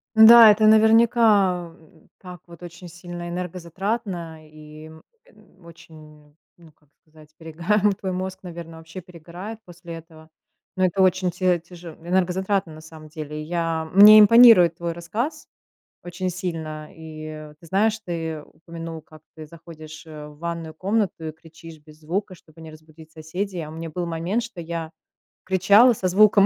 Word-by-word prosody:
Н-да, 220 0 +9
это 215 +1 +2
наверняка, 220 -5 +3
м, 160 -1 -24
так 180 -3 -12
вот, 170 0 -16
очень 175 +1 -11
сильно 175 0 -9
энергозатратно 180 -1 -5
и, 155 0 -14
м, 160 0 -15 0.6
очень, 165 -1 -16
м, 150 -1 -20 0.2
ну, 165 -2 -19
как 150 -1 -36
сказать, 155 -1 -21
перегар. 170 +6 -2
Твой 190 -2 -5
мозг, 185 +1 -5
наверно, 170 -2 -10
вообще 160 +3 -11
перегорает 180 +5 -11
после 170 -1 -11
этого. 160 -1 -15 0.5
Но 185 - +2
это 185 +2 0
очень 185 -1 +1
тя 180 -1 0
тяже 170 -1 -13
энергозатратно, 185 0 -1
на 155 - -13
самом 155 -1 -14
деле. 150 -1 -8
Я 165 0 -3
мне 210 +2 +9
импонирует 210 -6 +7
твой 170 -1 -4
рассказ 225 - -5 0.6
очень 180 +1 -5
сильно. 160 -4 -6
И 155 -1 -10
ты 170 - -16
знаешь, 215 +5 0
ты 165 -5 -6
упомянул, 165 +1 -10
как 155 0 -18
ты 155 -1 -10
заходишь, 155 -1 -13
э, 150 -1 -10
в 150 0 -15
ванную 165 -1 -6
комнату 195 -2 -2
и 155 - -7
кричишь 160 0 -15
без 155 0 -19
звука, 185 +5 -4
чтобы 165 -1 -20
не 160 -1 -11
разбудить 155 0 -17
соседей. 175 +4 -6
А 150 - -8
у - - -11
меня 165 0 -8
был 175 +2 -4
момент, 170 +8 -3
что 225 -6 -9
я 165 -1 -6 0.6
кричала 200 +6 +4
со 190 -4 -3
звуком 200 +1 +4
170 Hz, 160 wpm, -22 LUFS, 160-190 Hz, 0.6 s, Н-да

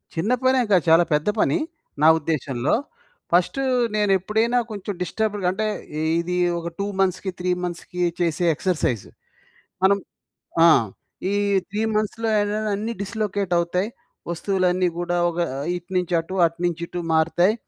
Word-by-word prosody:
చిన్న 180 +9 0
పనేం 260 -1 +3
కాదు 180 -5 +5
చాలా 165 +2 +7
పెద్ద 150 +4 +1
పని, - - +3 0.4
నా 155 - +6
ఉద్దేశంలో. 145 -4 -1 0.6
ఫస్ట్ 175 +8 +2 0.4
నేనెప్పుడైనా 210 +4 +2
కొంచెం 205 -1 -5
డిస్టర్బ్‌డ్‌గా 205 +2 -1
అంటే 215 +4 -2 0.5
ఇది 175 +1 -2 0.2
ఒక 170 - -6
2 200 - 0
మంత్స్‌కీ, 190 0 +1
3 180 0 -1
మంత్స్‌కీ 180 0 -5 0.2
చేసే 175 0 +1
ఎక్సర్సైజ్. 155 - 0 0.8
మనం 195 +1 +5 0.7
ఆ! - - +9 0.6
ఈ - - 0 0.4
త్రీ 210 +2 -2
మంత్స్‌లో 215 +2 -1
ఏంటంటే 210 +1 -1
అన్నీ 220 +3 -3
డిస్లొకేటవుతాయి. 195 -3 -1 0.4
వస్తువులన్నీ 185 +1 +1
గూడా 175 0 -1
ఒక 170 0 -5 0.4
ఇటు 175 +1 -9
నుంచి 180 -1 -1
అటు, 165 +3 -6
అటు 165 0 -2
నుంచి 170 -1 -1
ఇటు 175 - -5
మారుతాయి. 165 +5 +3
180 Hz, 130 wpm, -23 LUFS, 170-205 Hz, 0.8 s, ఆ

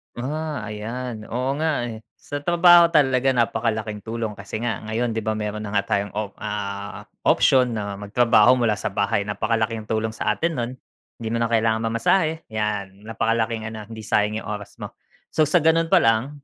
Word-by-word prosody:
Ah, 150 +2 -4
ayan, 110 +2 -5
oo 130 +4 -1
nga 150 -5 0
eh. 110 -1 -8 0.2
Sa 145 0 -6
trabaho 175 0 +6
talaga 135 -4 +3
napakalaking 110 -3 -1
tulong 110 -2 -4
kasi 100 +2 -6
nga 110 -3 -3
ngayon, 115 +1 -2
'di 110 - -2
ba, 110 - 0
meron 105 0 -4
na 100 - -6
nga 100 -1 0
tayong 100 0 0
op 105 -1 -4
ah, 100 -1 -5 0.2
option 125 -2 +4
na 100 -3 -3
magtrabaho 115 +4 +4
mula 115 -3 +2
sa - - -4
bahay, 100 +1 0
napakalaking 110 +1 -1
tulong 110 0 -1
sa 105 -1 -1
atin 170 +1 0
no'n. 120 +1 -2 0.4
Hindi 115 -1 -5
mo 115 - 0
na 115 - +1
kailangang 115 0 +1
mamasahe, 160 +8 +1
yan. 105 -1 -3
Napakalaking 115 0 -1
ano 110 -2 -8
hindi 110 -1 -9
sayang 105 0 +1
'yong - - -8
oras 105 -1 -7
mo. - - -6 0.4
So, 155 -2 +2
sa 165 +1 +3
gano'n 165 +1 +3
palang 130 +4 +2
115 Hz, 180 wpm, -23 LUFS, 105-125 Hz, 0.4 s, trabaho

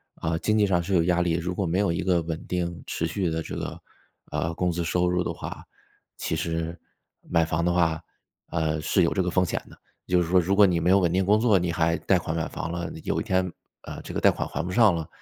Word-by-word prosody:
啊， 80 0 -2
经 110 0 +1
济 105 - +4
上 90 -3 +2
是 95 +2 -1
有 85 - +4
压 90 0 +2
力。 85 -2 +1
如 85 +2 -2
果 95 0 -1
没 85 +3 0
有 100 -4 +2
一 85 - -1
个 90 -2 +2
稳 80 -1 -5
定 85 -1 -3
持 - - -2
续 95 -4 -1
的 80 0 -2
这 - - -6
个， - - -5 0.5
啊， 80 - -1
工 90 +1 0
资 85 0 -2
收 90 +1 +1
入 90 0 +1
的 - - -2
话， - - -7 0.5
其 - - -2
实 85 0 -3 0.5
买 85 -2 +3
房 80 +1 -1
的 85 - +2
话， 80 -3 +1 0.5
呃， 80 -2 -1
是 90 +4 +2
有 85 - +2
这 95 - +1
个 90 - 0
风 90 +1 +2
险 - - -2
的。 - - -15 0.3
就 90 -1 +3
是 85 - -1
说 90 +1 +5
如 95 +3 +1
果 105 0 +7
你 90 -3 +2
没 90 - +1
有 100 +1 +6
稳 85 -3 +2
定 95 +1 +2
工 105 +3 +4
作， 110 -5 +4
你 85 -1 -1
还 85 0 +1
贷 95 - +2
款 80 -1 -4
买 80 -1 -1
房 80 - -5
了， 85 -1 -3
有 - - -1
一 - - -3
天， 95 -1 0 0.3
啊， - - -8
这 - - -8
个 - - +1
贷 - - +6
款 - - -3
还 - - -3
不 90 - -4
上 110 -3 +5
了， 80 -2 -4
85 Hz, 290 characters per minute, -26 LUFS, 85-95 Hz, 0.5 s, 果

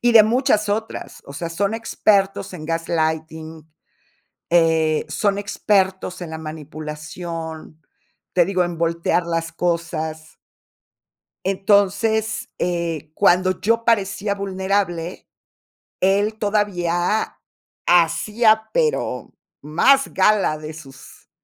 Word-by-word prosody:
Y 240 -1 +3
de 220 -2 +9
muchas 220 -2 +2
otras, 220 +2 -4
o 140 - -9
sea, 165 +4 -4
son 200 +6 -1
expertos 200 -3 +1
en 155 -4 -8
gaslighting 160 -1 -2 0.8
eh, 160 -2 +3
son 200 -2 +1
expertos 195 -2 0
en 165 - -6
la 160 - -5
manipulación, 155 +1 -7 0.5
te 175 -2 +4
digo, 185 -2 +1
en 175 -1 -5
voltear 170 +1 0
las 165 -1 -2
cosas. 165 -2 -3 1.1
Entonces, 205 +3 +1
eh, 170 -4 -2
cuando 185 0 +3
yo 230 +2 +1
parecía 205 -2 +1
vulnerable, 190 -3 -2 0.7
él 205 +3 +2
todavía 200 -5 0 0.2
a - - -13 0.5
hacía, 215 +6 +3
pero 475 -2 0 0.3
más 265 - +3
gala 195 -5 +3
de 155 +1 -8
sus 135 -4 -14
180 Hz, 105 wpm, -21 LUFS, 160-205 Hz, 1.1 s, de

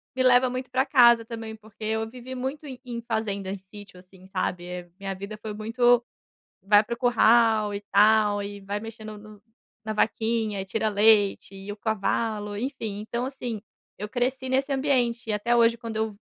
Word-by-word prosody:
me 260 - +1
leva 255 0 +5
muito 255 0 -5
para 260 +1 +2
casa, 235 -4 +6
também, 225 -1 -7
porque 220 0 -14
eu 220 +1 -1
vivi 250 +2 -9
muito 265 +4 -4
em 260 -3 -8
em 240 -2 -6
fazenda, 200 -4 -2
em 200 - -4
sítio, 190 -1 -13
assim, 185 0 -18
sabe, 185 -2 -3
eh, 180 0 -7
minha 195 -1 -4
vida 200 +3 -7
foi 215 0 -7
muito 240 +3 +2 0.6
vai 205 +2 +5
para 235 - -3
o - - -13
curral 225 -3 +4
e 200 - -3
tal, 210 0 +4
e 200 0 -7
vai 200 +1 -4
mexendo 215 -1 -9
no 210 0 -14 0.4
na 215 - -3
vaquinha 220 -1 0
e - - -4
tira 215 +3 -1
leite, 205 -1 +3
e 195 +1 -8
o - - -9
cavalo, 210 0 -2
enfim, 225 -3 -4
então, 235 +3 -3
assim, 250 -5 -5 0.4
eu 210 +1 -5
cresci 260 +2 -1
nesse 270 +2 +1
ambiente 245 -4 0
e - - +1
até 210 +3 +1
hoje 230 0 +4
quando 230 -2 -7
eu 220 -2 -2
220 Hz, 190 wpm, -26 LUFS, 205-240 Hz, 0.6 s, casa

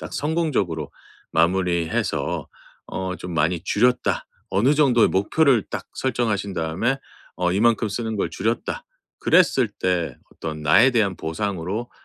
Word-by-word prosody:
딱 - - -7
성공적으로 140 - -1 0.4
마무리해서 85 0 0 0.4
'어 95 -1 -4
좀 90 -1 -7
많이 80 +3 +1
줄였다.' 125 +5 +1 0.2
어느 115 +9 +3
정도의 130 -6 +4
목표를 120 +5 +3
딱 - - -5
설정하신 115 -6 -1
다음에 80 +11 0 0.4
어 90 0 +1
'이만큼 110 +2 +2
쓰는 110 +1 -3
걸 85 - -1
줄였다.' 115 - -2 0.3
그랬을 135 - +4
때 90 -8 -1 0.2
어떤 80 -1 -6
나에 100 - +6
대한 105 -7 +1
보상으로 95 +6 -3
100 Hz, 290 characters per minute, -23 LUFS, 85-120 Hz, 0.4 s, 나에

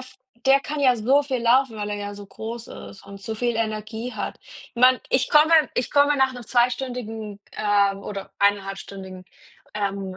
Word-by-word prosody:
f 255 0 -13 0.3
der 270 +1 +6
kann 300 +1 -5
ja 260 -3 +4
so 255 +6 +3
viel 260 -4 -2
laufen, 250 +1 +3
weil 210 0 -4
er 205 - -2
ja 205 0 -5
so 205 - -10
groß 225 +3 -8
ist 100 0 -11
und 200 0 -11
so 220 +2 -5
viel 240 0 -1
Energie 220 +2 -3
hat. - - -5 0.4
Man 255 +1 +5
ich 260 - +1
komme 300 +1 +5 0.2
ich 245 - -1
komme 285 0 +4
nach 265 -1 +2
'nem 245 -1 -9
zweistündigen 240 -4 -1
ähm, 200 -2 +2
oder 195 -1 -6
eineinhalbstündigen, 195 -2 -2 0.5
ähm, 195 -2 -3
225 Hz, 175 wpm, -23 LUFS, 205-255 Hz, 0.5 s, der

